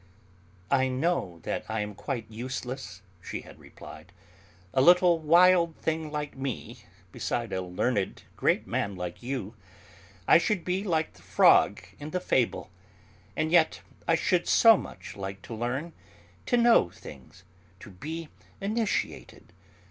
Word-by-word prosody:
"I 130 Hz, -1 st, +3 dB
know 130 Hz, -, -1 dB
that -, -, -3 dB
I 110 Hz, -1 st, -1 dB
am 105 Hz, 0 st, -4 dB
quite 115 Hz, +2 st, -4 dB
useless," 125 Hz, -4 st, -6 dB, 0.2 s
she -, -, -6 dB
had -, -, -15 dB
replied, 80 Hz, +3 st, -13 dB, 0.6 s
"a 130 Hz, -, +3 dB
little 175 Hz, +2 st, +6 dB
wild 170 Hz, +1 st, +5 dB
thing 160 Hz, -1 st, -2 dB
like 150 Hz, -1 st, -4 dB
me 125 Hz, -4 st, -6 dB, 0.3 s
beside 120 Hz, +4 st, -3 dB
a 95 Hz, -, -1 dB
learned 95 Hz, +3 st, -2 dB
great -, -, +1 dB
man 100 Hz, -1 st, -2 dB
like 90 Hz, -1 st, -6 dB
you. 120 Hz, -4 st, -4 dB, 0.7 s
I -, -, +7 dB
should 190 Hz, -1 st, -1 dB
be 185 Hz, +2 st, -1 dB
like 160 Hz, -5 st, -1 dB
the -, -, -20 dB
frog -, -, +4 dB, 0.2 s
in 145 Hz, +1 st, -6 dB
the 180 Hz, -, -2 dB
fable! 115 Hz, -, 0 dB, 0.6 s
And 155 Hz, 0 st, -1 dB
yet 165 Hz, -2 st, +3 dB, 0.3 s
I 165 Hz, -, +4 dB
should 175 Hz, +2 st, +1 dB
so 225 Hz, -1 st, +7 dB
much 185 Hz, -, -8 dB
like 95 Hz, -1 st, -7 dB
to 115 Hz, -, -8 dB
learn, 130 Hz, +9 st, -3 dB, 0.5 s
to 245 Hz, -, +3 dB
know 235 Hz, -, +5 dB
things, 95 Hz, -, -13 dB, 0.4 s
to -, -, -11 dB
be 155 Hz, -, -7 dB, 0.3 s
initiated. 215 Hz, +1 st, -3 dB
135 Hz, 140 wpm, -28 LUFS, 105-170 Hz, 0.7 s, I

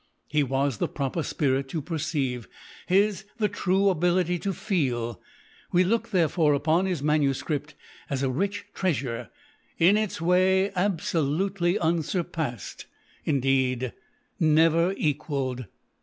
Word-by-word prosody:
His 150 Hz, -1 st, +2 dB
was 135 Hz, -2 st, 0 dB
the -, -, +1 dB
proper 140 Hz, +3 st, -2 dB
spirit 135 Hz, -3 st, 0 dB
to 160 Hz, -, -2 dB
perceive; 140 Hz, -6 st, -2 dB, 0.4 s
his 195 Hz, +1 st, +2 dB
the 215 Hz, -2 st, +2 dB
true 195 Hz, 0 st, +1 dB
ability 180 Hz, 0 st, +1 dB
to 200 Hz, -, -2 dB
feel. 130 Hz, -, -1 dB, 0.5 s
We 180 Hz, +1 st, +4 dB
look, 230 Hz, +4 st, 0 dB
therefore, 165 Hz, -5 st, +3 dB
upon 160 Hz, +6 st, +2 dB
his 175 Hz, -7 st, -2 dB
MS. 150 Hz, -3 st, +2 dB, 0.7 s
as 140 Hz, -1 st, -1 dB
a 135 Hz, -, +1 dB
rich 200 Hz, +9 st, -2 dB
treasure 135 Hz, -, -2 dB, 0.2 s
— 290 Hz, -, -37 dB
in 205 Hz, +3 st, +6 dB
its 215 Hz, -5 st, -2 dB
way 185 Hz, +3 st, +3 dB
absolutely 180 Hz, 0 st, 0 dB
unsurpassed 160 Hz, -, -2 dB, 0.2 s
— -, -, -32 dB
indeed, 130 Hz, -3 st, +1 dB, 0.5 s
never 165 Hz, +2 st, +4 dB
equalled. 140 Hz, -4 st, -1 dB
160 Hz, 125 wpm, -26 LUFS, 135-185 Hz, 0.7 s, in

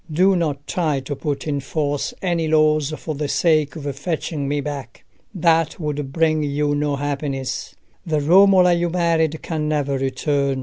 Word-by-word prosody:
Do 185 Hz, +5 st, +4 dB
not 145 Hz, -5 st, -2 dB
try 155 Hz, -4 st, 0 dB
to 140 Hz, +2 st, -5 dB
put 145 Hz, +1 st, -4 dB
in 145 Hz, -2 st, -1 dB
force 145 Hz, +1 st, -2 dB
any 170 Hz, -3 st, 0 dB
laws 155 Hz, -1 st, +3 dB
for 155 Hz, -, -5 dB
the 150 Hz, 0 st, -3 dB
sake 155 Hz, -1 st, +2 dB
of 155 Hz, -3 st, -7 dB
fetching 150 Hz, -1 st, -3 dB
me 145 Hz, +1 st, 0 dB
back: 140 Hz, -4 st, -6 dB, 0.3 s
that 165 Hz, -4 st, +1 dB
would 145 Hz, -3 st, -3 dB
bring 155 Hz, 0 st, +2 dB
you 145 Hz, 0 st, 0 dB
no 145 Hz, 0 st, 0 dB
happiness. 140 Hz, -2 st, -3 dB, 0.3 s
The 155 Hz, -2 st, 0 dB
Romola 180 Hz, +3 st, +5 dB
you 175 Hz, 0 st, 0 dB
married 165 Hz, -2 st, 0 dB
can 155 Hz, -2 st, -2 dB
never 140 Hz, -3 st, 0 dB
return. 135 Hz, +1 st, 0 dB
150 Hz, 165 wpm, -21 LUFS, 140-165 Hz, 0.3 s, Romola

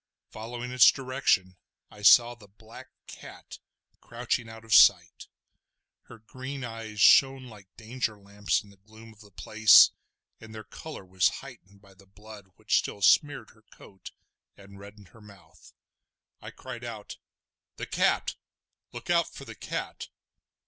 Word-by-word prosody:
Following 120 Hz, +3 st, -8 dB
its 125 Hz, 0 st, +6 dB
direction 130 Hz, -9 st, -1 dB, 0.3 s
I 105 Hz, -, -15 dB
saw 120 Hz, +3 st, +5 dB
the 115 Hz, -4 st, -18 dB
black 110 Hz, +5 st, -16 dB, 0.2 s
cat -, -, -13 dB, 0.4 s
crouching 120 Hz, 0 st, -4 dB
out 115 Hz, 0 st, -13 dB
of 110 Hz, -, -3 dB
sight. -, -, +4 dB, 0.8 s
Her 120 Hz, -, -15 dB
green 130 Hz, +5 st, -9 dB
eyes 115 Hz, -2 st, -9 dB
shone 135 Hz, +3 st, +4 dB
like 105 Hz, -5 st, -15 dB
danger 115 Hz, -1 st, -5 dB
lamps 100 Hz, +1 st, -3 dB
in 100 Hz, -, -19 dB
the 100 Hz, -, -22 dB
gloom 110 Hz, +3 st, -17 dB
of 105 Hz, -, -26 dB
the 105 Hz, -2 st, -17 dB
place, 110 Hz, +3 st, +5 dB, 0.5 s
and 110 Hz, -1 st, -13 dB
their 110 Hz, -, -9 dB
colour 110 Hz, +2 st, -11 dB
was 95 Hz, 0 st, +1 dB, 0.2 s
heightened 100 Hz, -6 st, -16 dB
by 100 Hz, -1 st, -20 dB
the 95 Hz, 0 st, -23 dB
blood 105 Hz, 0 st, -15 dB
which -, -, 0 dB
still 100 Hz, -, -7 dB
smeared 140 Hz, -4 st, +2 dB
her 110 Hz, -, -26 dB
coat 95 Hz, -1 st, -15 dB, 0.5 s
and 100 Hz, 0 st, -16 dB
reddened 100 Hz, -1 st, -15 dB
her 115 Hz, -, -20 dB
mouth. 100 Hz, -6 st, -19 dB, 0.7 s
I -, -, -10 dB
cried 125 Hz, -2 st, -11 dB
out: 110 Hz, -3 st, -9 dB, 0.6 s
"The -, -, -7 dB
cat! -, -, -1 dB, 0.6 s
look -, -, -7 dB
out -, -, +2 dB
for -, -, -12 dB
the -, -, -10 dB
cat!" -, -, -7 dB
110 Hz, 150 wpm, -26 LUFS, 100-120 Hz, 0.8 s, its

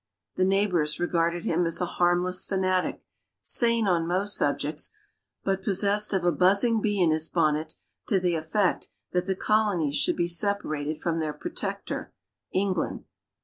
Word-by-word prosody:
The 185 Hz, -, +1 dB
neighbors 185 Hz, -6 st, +1 dB
regarded 170 Hz, 0 st, 0 dB
him 170 Hz, +1 st, +1 dB
as 165 Hz, -, 0 dB
a 180 Hz, -, 0 dB
harmless 175 Hz, +1 st, +1 dB
fanatic, 185 Hz, -1 st, 0 dB, 0.4 s
sane 230 Hz, -3 st, +3 dB
on 170 Hz, -3 st, +1 dB
most 190 Hz, +4 st, 0 dB
subjects, -, -, -1 dB, 0.5 s
but 195 Hz, 0 st, -1 dB
possessed 205 Hz, +1 st, +2 dB
of 190 Hz, -3 st, 0 dB
a 175 Hz, -, +4 dB
buzzing 200 Hz, +7 st, +3 dB
bee 205 Hz, -1 st, 0 dB
in 170 Hz, -3 st, +4 dB
his 155 Hz, +1 st, -1 dB
bonnet 155 Hz, -1 st, 0 dB, 0.3 s
to 195 Hz, -, +2 dB
the 180 Hz, -1 st, 0 dB
effect 165 Hz, +5 st, 0 dB, 0.2 s
that 180 Hz, +1 st, -1 dB
the 190 Hz, -, 0 dB
Colonies 190 Hz, -9 st, +1 dB
should -, -, +1 dB
be 170 Hz, -, +1 dB
separated 170 Hz, -5 st, 0 dB
from 165 Hz, 0 st, -1 dB
their 155 Hz, -2 st, -2 dB
protector, 345 Hz, -, -5 dB, 0.4 s
England. 190 Hz, -3 st, -1 dB
180 Hz, 150 wpm, -26 LUFS, 165-200 Hz, 0.5 s, a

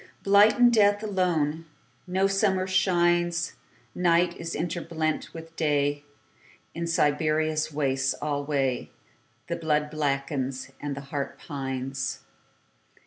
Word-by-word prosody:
Blight 200 Hz, +2 st, +6 dB
and 245 Hz, -1 st, +6 dB
death 205 Hz, -1 st, +4 dB
alone.No 165 Hz, -, -2 dB
summer 195 Hz, -1 st, +2 dB
shines. 175 Hz, -2 st, +2 dB, 0.4 s
Night 175 Hz, 0 st, +2 dB
is 165 Hz, 0 st, -5 dB
interblent 165 Hz, -1 st, -2 dB
with 165 Hz, 0 st, -10 dB
Day.In 145 Hz, +2 st, -3 dB
Siberia's 155 Hz, 0 st, +1 dB
wastes 135 Hz, -3 st, 0 dB
alwayThe 140 Hz, -1 st, -4 dB
blood 150 Hz, -1 st, +1 dB
blackens, 140 Hz, -3 st, -2 dB
the 140 Hz, -1 st, -4 dB
heart 140 Hz, 0 st, -5 dB
pines. 135 Hz, -2 st, -4 dB
155 Hz, 85 wpm, -26 LUFS, 145-175 Hz, 0.4 s, Blight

